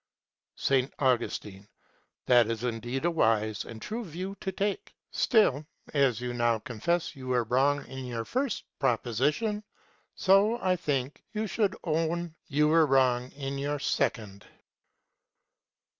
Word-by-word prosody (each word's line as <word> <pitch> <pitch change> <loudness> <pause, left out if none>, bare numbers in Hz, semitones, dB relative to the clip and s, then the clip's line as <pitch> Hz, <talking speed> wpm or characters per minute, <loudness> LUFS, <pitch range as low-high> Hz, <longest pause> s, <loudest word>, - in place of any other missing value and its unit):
S. 135 -1 +2
Augustine. 110 -6 -1 0.6
That 120 -2 +5
is 115 0 -3
indeed 120 +4 -2
a 175 - +3
wise 110 -8 +1
and 115 - -9
true 225 - -4
view 185 +2 -6
to 190 - -2
take. 200 +1 -3 0.2
Still 155 - +3 0.3
as 135 -6 +3
you 125 0 -3
now 120 -1 +2
confess 155 +11 -2
you 130 -1 -9
were 125 -1 +2
wrong 135 +5 +1
in 130 -1 -7
your 115 -2 -4
first 260 -2 -1 0.2
proposition, 145 - 0 0.5
so 200 +4 +4
I 185 -3 +2
think 140 -5 -2
you 215 0 -1
should 205 -1 0
own 165 +1 -1
you 150 +1 +2
are 165 -2 +5
wrong 130 -2 +3
in 140 -1 -4
your 145 +1 -1
second. 110 -8 -2
135 Hz, 135 wpm, -29 LUFS, 120-170 Hz, 0.6 s, That